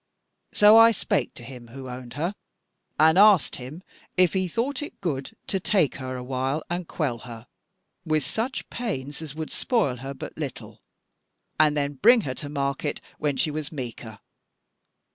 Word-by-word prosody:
So 210 +1 +7
I 225 0 +9
spake 225 - -1
to 120 - -9
him 120 -1 -10
who 130 +3 -9
owned 125 -1 -8
her, 170 +6 -1 0.7
and 160 +4 +6
asked 205 -6 +6
him 135 +8 -9 0.3
if 180 -2 +4
he 185 -1 +1
thought 250 - -1
it 295 - -8
good 140 -8 -3
to 195 - -1
take 185 -5 +1
her 130 -1 -5
a 125 - -5
while 135 +4 -2
and 175 -1 -2
quell 135 -8 -2
her 115 -1 -10 0.6
with 155 -2 +1
such 235 - -2
pains 150 - -4
as 150 -2 -7
would 160 -1 -5
spoil 210 - 0
her 135 +3 -7
but - - -8
little, - - -7 0.8
and 150 -1 +4
then 145 0 0
bring 235 +2 +7
her 130 -9 -3
to 145 +2 -6
market 140 0 -2 0.2
when 145 -3 0
she 155 - +1
was 150 -1 -4
meeker. 120 -6 -7
150 Hz, 170 wpm, -25 LUFS, 130-185 Hz, 0.8 s, I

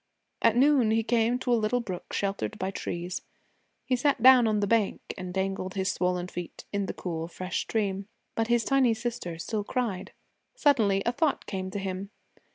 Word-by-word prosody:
At 230 - +4
noon 265 -2 +5
he 225 +1 +2
came 235 +1 +2
to 250 -1 0
a 230 - +3
little 215 +3 +1
brook 185 -7 -6
sheltered 200 +1 -2
by 190 0 -2
trees. 175 -1 -4 0.6
He 260 - +2
sat 250 -1 +1
down 255 -2 +8
on 215 -1 +2
the 205 - +2
bank 215 -1 +2 0.2
and 185 -2 -6
dangled 190 0 -2
his 190 0 +1
swollen 180 0 -1
feet 175 -1 -7
in 200 -1 0
the - - -3
cool, 165 -2 -4
fresh 185 +1 -4
stream. 200 -3 -2 0.3
But 225 0 0
his 240 -1 +3
tiny 265 -4 +3
sister 220 -8 -4
still 210 +5 -3
cried. 210 -5 -2 0.4
Suddenly 220 - +3
a 235 - +2
thought 285 +3 0
came 190 -2 -4
to 190 - -5
him. 195 0 -4
205 Hz, 185 wpm, -28 LUFS, 190-240 Hz, 0.6 s, down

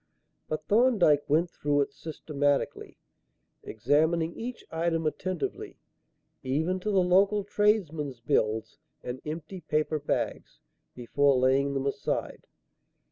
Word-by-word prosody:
But 155 0 -4
Thorndyke 205 - +3
went 165 +4 +2
through 145 -3 0
it 140 - -2
systematically, 145 -2 -2 0.6
examining 160 +8 +1
each 245 +1 -7
item 165 0 -1
attentively, 180 +3 -3 0.6
even 160 +8 -1
to 210 - -3
the 195 -3 +3
local 195 +3 +3
tradesmen's 170 - 0
bills 110 -1 -1 0.2
and 125 +1 -6
empty 165 +4 -6
paper 155 0 0
bags, 145 - -3 0.4
before 135 +3 +2
laying 135 +2 +2
them 135 0 -1
aside. 140 - -3
155 Hz, 110 wpm, -28 LUFS, 140-180 Hz, 0.6 s, Thorndyke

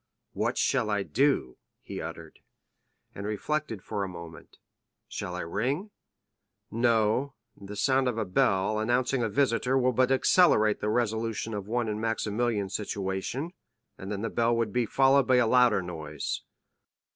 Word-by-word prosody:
"What - - -1
shall 125 -5 +1
I 100 -1 0
do!" 135 - +1 0.3
he - - -6
uttered, - - -8 0.7
and 100 +1 -6
reflected 110 0 -3
for 105 -2 -3
a 95 - -4
moment; 85 -2 -11 0.5
"shall 90 -3 -5
I 90 - -3
ring? 130 - -2 0.8
No, 115 +3 +1 0.2
the 100 +1 -9
sound 130 +4 +2
of 120 -3 -1
a 110 - -1
bell, 95 +3 +1
announcing 125 +3 +1
a 115 - 0
visitor, 130 +2 +1
will 130 -1 +3
but 130 +2 +2
accelerate 130 - +4
the 105 - 0
resolution 115 -1 -1
of 100 -1 -5
one 120 +1 -1
in 105 0 -3
Maximilian's 110 -2 -1
situation, 100 - -3 0.4
and 95 +2 -8
then 105 0 -3
the 115 - -2
bell 120 0 +2
would 115 -3 -1
be 125 -2 +1
followed 135 +1 +4
by 130 - +4
a 125 -1 +4
louder 120 -4 +4
noise." 80 -4 -5
110 Hz, 155 wpm, -28 LUFS, 100-125 Hz, 0.8 s, accelerate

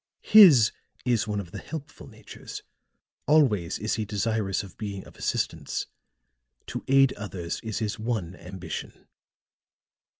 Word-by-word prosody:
His 165 - +8 0.3
is 120 -2 +1
one 105 -1 -1
of 90 -4 -7
the - - -6
helpful 145 -2 -8
natures; - - -10 0.6
always 120 - +3
is 110 +2 -2
he 110 - -1
desirous 105 -1 -1
of 100 - -12
being 100 -3 -6
of - - -15
assistance. - - -2 0.8
To - - -6
aid 135 -1 +5
others 95 -5 -5
is 110 -2 -4
his 105 -2 -2
one 110 -6 -2
ambition." 90 0 -8
110 Hz, 130 wpm, -26 LUFS, 95-125 Hz, 0.8 s, His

